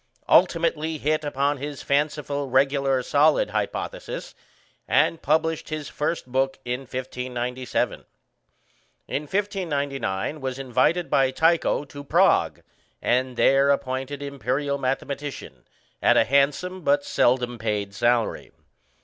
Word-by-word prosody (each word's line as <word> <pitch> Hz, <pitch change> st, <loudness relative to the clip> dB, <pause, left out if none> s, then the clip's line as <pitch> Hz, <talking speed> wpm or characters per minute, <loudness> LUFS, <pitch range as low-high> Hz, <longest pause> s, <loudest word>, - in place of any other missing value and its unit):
Ultimately 160 Hz, -1 st, +3 dB
hit 155 Hz, +1 st, 0 dB
upon 145 Hz, 0 st, 0 dB
his 145 Hz, 0 st, -6 dB
fanciful 145 Hz, -1 st, -1 dB
regular 135 Hz, 0 st, +2 dB
solid 145 Hz, -4 st, +3 dB
hypothesis, 105 Hz, -1 st, -4 dB, 0.5 s
and 165 Hz, -, +2 dB
published 160 Hz, +2 st, 0 dB
his 155 Hz, -2 st, -4 dB
first 150 Hz, +3 st, -2 dB
book 135 Hz, +1 st, 0 dB
in 125 Hz, +1 st, -2 dB
1597. 125 Hz, -1 st, -3 dB, 1.0 s
In 145 Hz, -, -2 dB
1599 145 Hz, -, -2 dB
was 130 Hz, -1 st, -3 dB
invited 135 Hz, +7 st, +1 dB
by 135 Hz, -1 st, +4 dB
Tycho 160 Hz, +1 st, +2 dB
to 145 Hz, 0 st, -10 dB
Prague, -, -, +2 dB, 0.4 s
and 125 Hz, 0 st, 0 dB
there 135 Hz, +1 st, +4 dB
appointed 135 Hz, +1 st, -1 dB
Imperial 140 Hz, +1 st, -2 dB
mathematician, 140 Hz, +2 st, -4 dB, 0.4 s
at -, -, +4 dB
a -, -, +5 dB
handsome 140 Hz, +8 st, +1 dB
but 285 Hz, +4 st, +2 dB
seldom 125 Hz, -, +1 dB
paid 105 Hz, -2 st, -2 dB
salary. 120 Hz, +2 st, 0 dB
140 Hz, 110 wpm, -24 LUFS, 130-150 Hz, 1.0 s, a